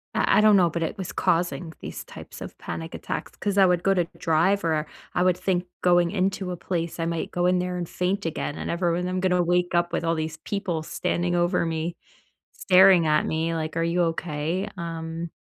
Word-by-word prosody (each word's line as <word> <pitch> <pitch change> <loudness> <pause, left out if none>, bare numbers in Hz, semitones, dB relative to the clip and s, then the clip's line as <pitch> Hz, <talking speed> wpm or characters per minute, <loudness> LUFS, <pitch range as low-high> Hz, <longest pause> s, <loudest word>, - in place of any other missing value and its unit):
I - - +3
I - - +6
don't 215 -1 +6
know, 175 -2 +4
but 165 +1 -2
it 180 - -3
was 185 -2 -5
causing 175 -1 0
these - - -6
types - - -11
of - - -8
panic 80 -1 -6
attacks, - - -5
'cause 205 -1 -2
I 195 - +7
would 180 -1 +2
go 195 - +4
to 175 -2 +1
drive 175 +5 +2
or, 155 -2 0 0.3
I 180 - +2
would 180 -1 +3
think 185 -1 0 0.2
going 175 -1 +4
into 190 -1 -1
a 180 - -4
place, 170 -2 -3
I 165 - 0
might 165 -1 -2
go 175 0 0
in 180 0 +3
there 180 0 -2
and 175 -2 -3
faint 185 +2 -2
again, 155 -2 -3
and - - -5
everyone 175 0 0
I'm 185 0 -1
gonna 180 -1 +2
wake 175 +1 +1
up 175 0 +2
with - - -1
all 165 0 +1
these 160 0 -3
people 180 -2 -3
standing 175 +2 -1
over 175 0 +2
me, 165 +1 -2 0.6
staring 185 -3 +5
at 150 0 +3
me, 165 +1 -1
like, 160 0 -3
"Are 165 - +1
you 175 +1 +1
okay, 165 +5 -3
um?" 165 -1 -5
175 Hz, 220 wpm, -25 LUFS, 165-180 Hz, 0.6 s, I